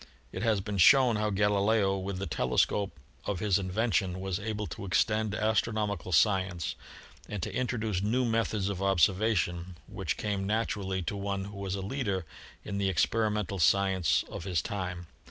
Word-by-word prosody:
It 95 - -5
has 110 -3 +2
been 100 0 -4
shown 125 +1 +6
how 105 0 0
Galileo 100 0 +2
with 95 0 -4
the 95 - -3
telescope 75 +8 0 0.3
of 100 -4 -2
his 100 -1 +2
invention 95 -1 0
was 95 0 -2
able 105 0 -3
to - - -7
extend 105 +2 +1
astronomical 110 -2 0
science 95 -1 +2 0.6
and 105 -4 -4
to - - -4
introduce 110 -6 -1
new 120 +5 +1
methods 110 -3 0
of 100 -2 -3
observation, 95 -2 +1
which - - -4
came 100 -2 -2
naturally 100 -3 -1
to 95 - -3
one 100 -1 -3
who 100 +1 -9
was 100 -1 -3
a 100 - -4
leader 100 - -2 0.4
in 100 -1 -3
the 100 -1 +1
ex 95 - +3
perimental 105 -4 -1
science 95 +1 +3
of - - -7
his 90 -3 -1
time. 90 -3 -4
100 Hz, 165 wpm, -29 LUFS, 95-105 Hz, 0.6 s, shown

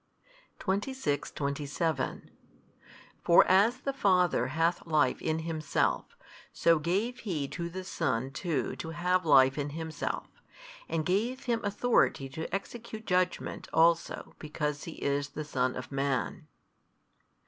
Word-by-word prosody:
26, 200 - -1
27 140 0 -2 0.9
For 170 - +7
as 220 +7 +4
the 275 - -2
Father 180 - +3
hath 165 +5 0
life 150 -5 +2
in 160 0 0
Himself, 155 -3 -1 0.3
so 165 -1 +3
gave 200 +10 -1
He 155 -9 -2
to 170 -1 -4
the 185 +2 -6
Son 135 -8 -1
too 165 +1 -2
to 160 - -5
have 180 +1 0
life 135 -1 +6
in 145 0 -2
Himself, 160 +1 -4 0.6
and 160 -2 -1
gave 225 +9 0
Him 235 -2 -1
authority 205 - +2
to 160 +5 -6
execute 220 +3 -5
judgment 180 -1 0
also 165 +1 +2
because 150 -1 -3
He 165 - -6
is 140 0 -1
the 155 - -6
Son 130 -3 0
of 125 - -7
Man. 135 -2 -1
165 Hz, 125 wpm, -30 LUFS, 145-190 Hz, 0.9 s, For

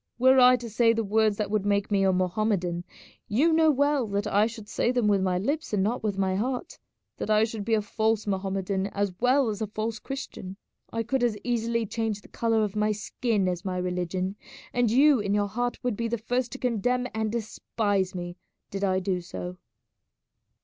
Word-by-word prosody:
Were 260 +2 +5
I 250 0 +8
to 240 -1 -6
say 230 +1 +3
the 225 0 -1
words 215 0 +2
that 210 -2 -2
would 215 -2 +1
make 200 0 0
me 195 -1 +3
a 190 - +4
Mohammedan, 180 -1 0 0.4
you 290 +11 +3
know 320 0 +5
well 285 -3 +2
that 200 +1 -1
I 210 +1 +3
should 225 -2 -9
say 235 - 0
them 245 -4 +1
with 200 -2 +3
my 185 -1 +1
lips 280 - -2
and 195 -2 +2
not 230 +5 -1
with 205 -3 -2
my 190 -1 +1
heart, 245 +5 -3 0.4
that - - -4
I 215 0 +4
should 220 -2 -3
be 225 +2 +2
a 210 - 0
false 220 +1 0
Mohammedan 195 -1 -1
as 200 -1 -2
well 255 +1 +3
as 210 0 -4
a 220 - -1
false 215 +2 -3
Christian. 195 -8 -7 0.3
I 230 0 -1
could 245 +2 -1
as 230 -3 +1
easily 230 -1 0
change 220 -1 -2
the - - -17
colour 225 -1 +1
of 210 -1 -3
my 210 0 +2
skin 210 -1 -1
as 180 -1 -2
my 185 -1 -3
religion, 180 +2 -2 0.4
and 245 -2 +2
you 275 +3 +5
in 200 0 0
your 205 0 +1
heart 245 +4 -2
would 245 -3 0
be 230 +2 -2
the 235 +1 -1
first 245 +3 -2
to - - -5
condemn 250 0 0
and 220 -1 -1
despise 205 -4 -1
me 175 0 -5 0.3
did 195 0 -4
I 190 -1 +2
do 185 -1 -1
so." 180 +1 -7
215 Hz, 210 wpm, -27 LUFS, 195-235 Hz, 0.4 s, I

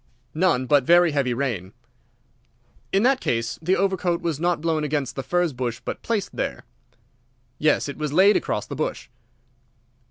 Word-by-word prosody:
"None; 160 -6 +2
but 145 0 +4
very 175 +3 +5
heavy 140 -4 0
rain." 115 -8 -3 1.2
"In 195 +2 +2
that 265 +1 +3
case 115 0 -2
the 180 +4 +2
overcoat 185 -3 0
was 165 -4 -3
not 175 +1 +1
blown 160 -1 0
against 145 -3 -2
the 135 - -3
furze 175 +1 0
bush, 120 -2 -3
but - - -5
placed 220 -4 -2
there." - - -3 1.0
"Yes, 150 -1 +2
it 140 - -6
was 150 -2 -2
laid 190 +6 +5
across - - -1
the - - -7
bush." - - -4
155 Hz, 160 wpm, -23 LUFS, 135-175 Hz, 1.2 s, very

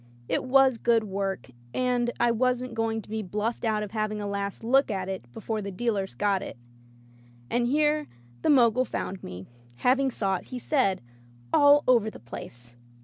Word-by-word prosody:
It - - 0
was 260 -2 +4
good 230 -2 +3
work, 195 - -3 0.2
and 250 -1 +1
I 240 0 +4
wasn't 250 +1 0
go 225 0 0
ing 225 -1 -3
to - - -17
be 220 0 -2
bluffed 210 +4 -3
out 215 -2 +1
of 205 - -7
having 215 -1 -2
a 205 - -4
last 200 +1 -4
look 265 +4 +3
at 190 -3 -2
it 185 -11 -6
before 220 - -4
the 200 - -5
dealers 200 -1 -2
got 200 -2 +1
it. - - -7 0.9
And 240 0 +1
here 300 +2 +2 0.3
the - - +1
Mogul 250 -3 +5
found 195 -6 -4
me, 90 +1 -8 0.3
having 265 - +2
sought, 195 -6 -1
he 255 - -7
said, 245 -8 +1 0.5
all 290 0 +6
over 235 -4 +4
the - - -12
place. 120 0 -9
225 Hz, 180 wpm, -27 LUFS, 195-250 Hz, 0.9 s, all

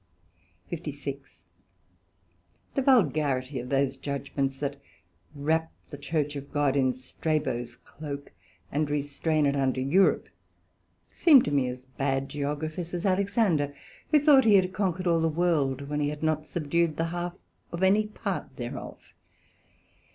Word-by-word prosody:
SECT.56 140 -4 -6 1.3
The 275 - +1
vulgarity 150 - +2
of 125 +1 -7
those 135 0 +1
judgements 140 -1 -3
that 140 0 -3 0.6
wrap 160 +3 0 0.2
the 145 - -6
Church 150 0 -1
of 140 0 -7
God 145 -2 +1
in 130 -2 +3
Strabo's 130 -2 -2
cloak, 140 0 -8 0.4
and 150 +1 0
restrain 145 +1 0
it 140 0 +2
unto 135 -2 +1
Europe, 160 +9 +3 0.8
seem 295 -7 +6
to - - -2
me 140 -3 +2
as 125 +1 -6
bad 135 +1 -2
Geographers 155 +4 -3
as 175 - -3
Alexander, 190 -7 +1 0.3
who 305 - +6
thought 285 -3 +6
he 215 -2 +6
had 185 -1 +3
Conquer'd 190 -2 -1
all 170 -2 +3
the 165 - +2
World, 150 -5 0
when 150 +1 -2
he 145 -1 +1
had 150 +1 -6
not 155 -1 0
subdued 165 0 0
the 165 0 0
half 175 0 -3 0.4
of 170 +2 -3
any 205 +3 +4
part 215 - -4
thereof. - - -7
150 Hz, 140 wpm, -27 LUFS, 140-175 Hz, 1.3 s, seem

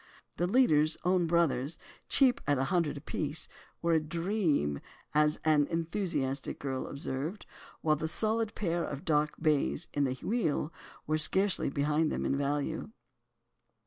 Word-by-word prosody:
The 175 - +1
leaders—own 180 - +3
brothers—cheap 170 - +1
at 145 -1 +3
a 130 - +1
hundred 170 -5 +1
apiece, 150 +2 -2 0.4
were 170 0 +3
a 160 - +5
"dream," 165 - 0 0.3
as 150 0 +3
an 150 -2 +4
enthusiastic 165 -5 -2
girl 135 -2 -3
observed, 140 +7 -4 0.4
while 155 -1 +2
the 160 - -2
solid 220 +5 -1
pair 170 -4 -1
of 140 0 -5
dark 150 -1 +1
bays 155 +1 +1
in 145 -1 +2
the 130 -1 -1
wheel 170 -8 0 0.3
were 155 +1 0
scarcely 190 +4 +3
behind 150 +3 +1
them - - -2
in - - +1
value. 145 +6 -2
155 Hz, 135 wpm, -31 LUFS, 145-175 Hz, 0.4 s, a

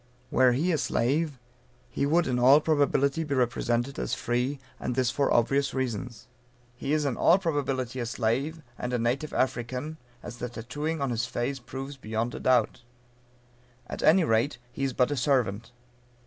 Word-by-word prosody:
Were 130 -1 +5
he 160 +9 +1
a 155 - +1
slave, 145 +5 0 0.5
he 140 - 0
would 170 +3 +3
in 125 -1 0
all 130 +4 +7
probability 145 -1 +2
be 145 -3 -2
represented 120 +1 0
as - - -1
free, 125 +4 -1 0.2
and 125 - -3
this 125 -2 +2
for 140 +1 +1
obvious 135 +5 +2
reasons. 125 -2 -3 0.5
He 135 - -4
is 150 -1 +2
in 135 -4 -1
all 175 - +5
probability 135 -8 -2
a 120 - -2
slave, 130 +8 -1 0.2
and 125 0 -3
a - - +2
native 125 +6 -1
African, 130 +4 -2 0.3
as 120 - -8
the 125 0 -4
tattooing 145 +7 -4
on 135 -2 0
his 120 +1 -1
face 125 +3 -2
proves 135 +3 -7
beyond 110 0 -3
a - - -5
doubt. 125 -4 +2 1.0
At - - -6
any 175 +3 +5
rate, 120 0 +1
he 135 - -2
is 135 - -2
but 125 +2 +2
a - - 0
servant. 120 -4 0
130 Hz, 175 wpm, -27 LUFS, 120-145 Hz, 1.0 s, all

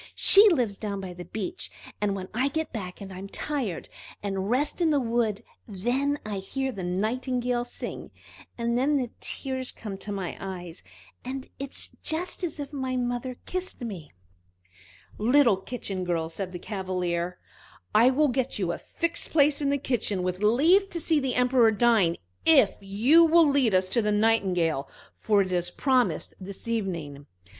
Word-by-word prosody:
She 410 +2 +7
lives 240 - 0
down 200 -2 -3
by 185 -2 -6
the 175 0 -9
beach, 345 +12 -5 0.3
and 205 -1 +1
when 190 -1 -5
I 255 +5 +1
get 315 +3 -3
back 185 -4 -6
and 195 -1 -8
am 190 +2 -8
tired, 250 - -3 0.4
and 195 -1 -2
rest 285 +8 0
in 335 - +4
the 295 -2 +3
wood, 230 -4 0 0.2
then 245 +8 0
I 205 -2 -3
hear 265 +7 -3
the 195 -6 -6
Nightingale 240 +6 -1
sing. - - -7 0.5
And 235 0 0
then 280 +4 +2
the 250 -3 -2
tears 260 -1 -4
come 215 - -8
into 195 +2 -6
my 195 -3 -4
eyes, 180 -3 -7 0.4
and 260 +1 -5
it 275 0 -4
is - - +3
just 350 +4 -2
as 320 -3 -3
if 285 0 -6
my 260 -2 -2
mother 245 0 -2
kissed 370 -5 -3
me!" 190 -11 -6 1.1
"Little 240 -1 +4
Kitchen 195 -2 -5
girl," 165 -2 -1
said 185 +2 -4
the 180 - -5
Cavalier, 180 -3 -3 0.6
"I 230 +4 +6
will 290 +3 +3
get 255 0 -1
you 185 -4 0
a - - -5
fixed 335 0 -2
place 295 -1 +3
in 280 - +1
the 280 - +2
kitchen, 225 -8 -1
with 180 0 -2
leave 320 - +4
to 340 - -3
see 320 -1 +2
the 265 -3 -1
Emperor 250 -2 +4
dine, 220 -6 +3 0.3
if 275 -11 +6
you 225 +12 +5
will 330 0 +6
lead 270 -8 +3
us 185 0 +3
to 235 - +2
the 210 -1 0
Nightingale, 185 -9 +1 0.3
for 205 -2 +2
it 185 - -6
is 175 -1 0
promised 255 +5 +1
for - - -10
this 200 +3 -8
evening." 170 -11 -3
230 Hz, 175 wpm, -27 LUFS, 190-270 Hz, 1.1 s, She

